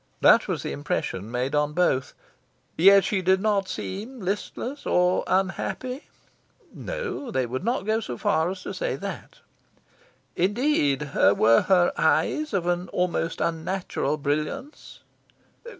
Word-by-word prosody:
That - - +6
was - - -2
the - - -3
impression 95 +8 -3
made 125 +3 -2
on 150 0 +1
both. 150 -6 +1 0.6
"Yet 195 +3 +7
she 200 -3 0
did 190 +1 +3
not 200 -2 0
seem 220 +7 -6
listless 210 +8 -4
or 180 +1 +2
unhappy?" 220 - -2 0.7
No, 485 - -5
they 130 - 0
would 130 +6 -4
not 235 -1 -1
go 220 +1 +1
so 125 - -6
far 160 +7 +1
as 185 0 -6
to - - -5
say - - -2
that. - - -8 0.9
"Indeed, 175 - +1
were 110 +3 +5
her 180 -2 +4
eyes 305 0 +1
of 190 -5 -1
an 175 +1 -1
almost 175 -2 -1
unnatural 165 -2 -2
brilliance?" 155 - -4
185 Hz, 135 wpm, -25 LUFS, 150-215 Hz, 0.9 s, Yet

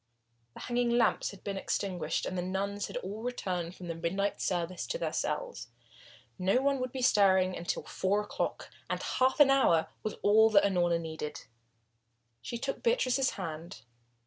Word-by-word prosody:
The - - -9
hanging 245 0 0
lamp 230 -2 +3
had 200 - -12
been 200 -1 -3
extinguished 180 -6 -2
and 185 - -3
the 180 - -1
nuns 200 +3 -2
had - - -5
all 210 -1 -5
returned 185 -8 -3
from 180 - -9
the 165 - -2
midnight 190 +5 -2
service 175 0 -2
to - - -2
their - - -2
cells. - - -3 0.7
No 190 +7 +3
one 275 0 +1
would 255 -1 -3
be 260 -1 -4
stirring 190 -5 +4
now - - -6
until 170 - -2
four 200 +2 0
o'clock, 210 - -4 0.2
and - - -1
half 260 +3 +1
an 280 -2 +8
hour 170 -12 +4
was 215 - -3
all 220 +2 +6
that 205 -2 +5
Unorna 175 -3 +2
needed. 160 -2 -5 1.0
She 235 - -5
took 270 +3 -4
Beatrice's 270 - +2
hand. 165 - -6
200 Hz, 170 wpm, -31 LUFS, 175-245 Hz, 1.0 s, an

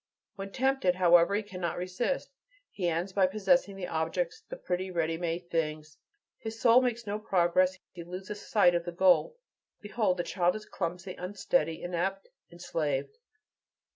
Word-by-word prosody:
When 195 0 -7
tempted, 265 -8 +1
however, 175 +1 +5
he 215 - 0
cannot 180 -4 -4
resist. 185 - -2 0.4
He 180 -3 -2
ends 170 +4 -2
by 190 -1 +4
possessing 205 +2 +2
the 195 -2 -5
objects, 435 - -2
the - - -5
pretty, 185 - -3
ready 165 -2 0
made 175 +1 -4
things; 155 -1 -2 0.4
his 225 0 -6
soul 235 +1 +6
makes 240 -2 -1
no 205 +1 -3
progress; 185 -2 +2
he 170 - -9
loses 190 +4 -7
sight 200 -5 +4
of 170 -1 -1
the 175 - -4
goal. 190 - +3 0.4
Behold 205 -3 0
the 175 - -1
child 180 +1 +1
clumsy, 180 +1 -4
unsteady, 180 -1 -1
inept, 185 +3 -2 0.2
enslaved! 165 - -3
185 Hz, 150 wpm, -30 LUFS, 175-210 Hz, 0.4 s, soul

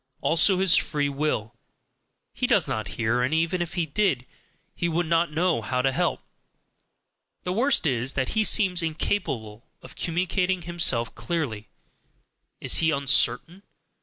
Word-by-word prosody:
Also 170 +4 +3
his 190 -2 +4
"free 145 -2 +1
will": 140 -7 -2 0.8
he - - -1
does - - +2
not 110 -2 -3
hear 115 +1 +1
and 130 +6 0
even 165 +2 0
if 175 +1 -4
he 175 -2 0
did, 145 -6 0 0.5
he 170 - -2
would 170 +2 0
not 165 0 +1
know 165 -4 +1
how 125 +4 -2
to 135 +1 +2
help. - - -1 1.2
The 180 - -2
worst 250 0 +2
is 130 -2 0
that 130 -1 -1
he 220 - +1
seems 190 -4 +3
incapable 135 - -3 0.2
of - - -12
communicating 180 +1 -1
himself 165 -9 0
clearly; 120 - -4 0.9
is - - +2
he 160 - +2
uncertain? 140 +4 +1
160 Hz, 145 wpm, -25 LUFS, 125-175 Hz, 1.2 s, his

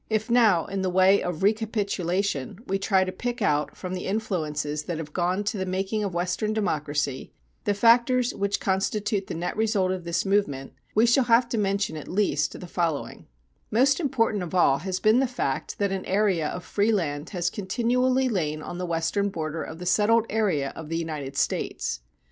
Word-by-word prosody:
If 220 +2 -1
now 220 -9 +4
in 195 0 -3
the 190 - 0
way 185 +2 +5
of 180 -1 -3
recapitulation, 200 - 0
we 195 +1 -1
try 190 -1 +3
to 185 - -3
pick 240 +6 -4
out 150 -8 0
from 185 -1 -5
the 180 - -4
influences 155 -8 -2
that 170 - -3
have 150 -2 -7
gone 180 +3 0
to 210 0 -2
the 190 - -1
making 195 +3 -1
of 195 -4 -3
Western 180 +5 -1
democracy 150 -9 -2 0.3
the 205 - +1
factors 240 +3 +4
which 200 0 -1
constitute 200 +1 -1
the - - -5
net 170 +2 -3
result 210 -4 +1
of 185 -1 -3
this 170 +2 -1
movement, 150 -11 0 0.2
we 220 +2 +5
shall 240 +2 +4
have 235 +1 +4
to 235 - -1
mention 200 -4 0
at 150 - -8
least 175 -7 0
the - - -8
following: 170 -4 -3 0.4
Most 270 +7 +3
important 230 - +1
of 180 0 -5
all 140 -6 +4
has 185 +3 -3
been 215 +5 +4
the 270 - +2
fact 240 - -3
that 200 -1 0
an 195 -1 -3
area 190 -5 +2
of 180 - -5
free 205 +2 +1
land 150 -7 -1
has 175 -2 -1
continually 250 +6 +1
lain 155 -9 -1
on 175 - -6
the 180 - -3
western 170 +5 0
border 160 -3 -4
of 160 - -7
the 180 - -7
settled 215 +5 +3
area 190 -11 0
of 160 -2 -8
the 165 - -1
United 150 -4 -4
States. 100 - -1
190 Hz, 195 wpm, -26 LUFS, 165-215 Hz, 0.4 s, way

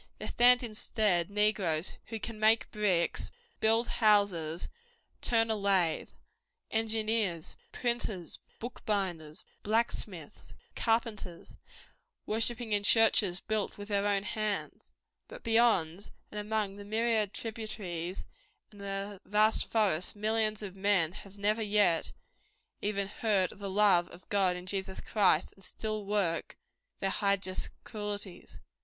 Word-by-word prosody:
There - - -6
stand 245 +1 +5
instead 215 -5 +1
negroes 200 -6 +1
who 225 -1 -5
cap 230 +1 -5
make 220 +1 +3
bricks, 190 -5 0 0.3
build 225 +2 +3
houses, 200 -7 +2 0.5
turn 225 -1 +2
a - - +2
lathe; 195 -5 +1 0.6
engineers, 220 -6 0 0.2
printers, 225 -8 -1 0.2
bookbinders, 190 -10 -3 0.2
blacksmiths, 225 +3 -2 0.2
carpenters, 225 -6 -1 0.7
worshipping 225 +1 -1
in 205 -1 +2
churches 205 -3 +4
built 215 -2 -2
with 205 +1 -8
their 200 0 +1
own 200 -1 +1
hands. 215 -1 -3 0.4
But - - -11
beyond, 215 -6 +3 0.2
and 210 - -4
among 210 -1 -1
the 205 - -8
myriad 220 -1 +1
tributaries 200 -7 -5 0.5
and 205 -1 -13
the 195 0 -5
vast 215 +1 +3
forests 195 -6 +1
millions 215 0 0
of 195 -2 -6
men 190 -4 +2
have 195 +2 -12
never 210 +2 +1
yet 205 -6 +2 0.7
even 200 -1 -1
heard 200 -3 +1
of - - -14
the 200 -1 -4
love 190 -3 +4
of 180 - -14
God 190 -3 +2
in 180 0 -7
Jesus 190 0 -4
Christ, 190 -6 +2
and 195 - -17
still 215 +1 -4
work 195 -5 0 0.4
their 195 - +1
hideous 200 -2 0
cruelties. 205 -3 -6
205 Hz, 125 wpm, -31 LUFS, 190-220 Hz, 0.7 s, stand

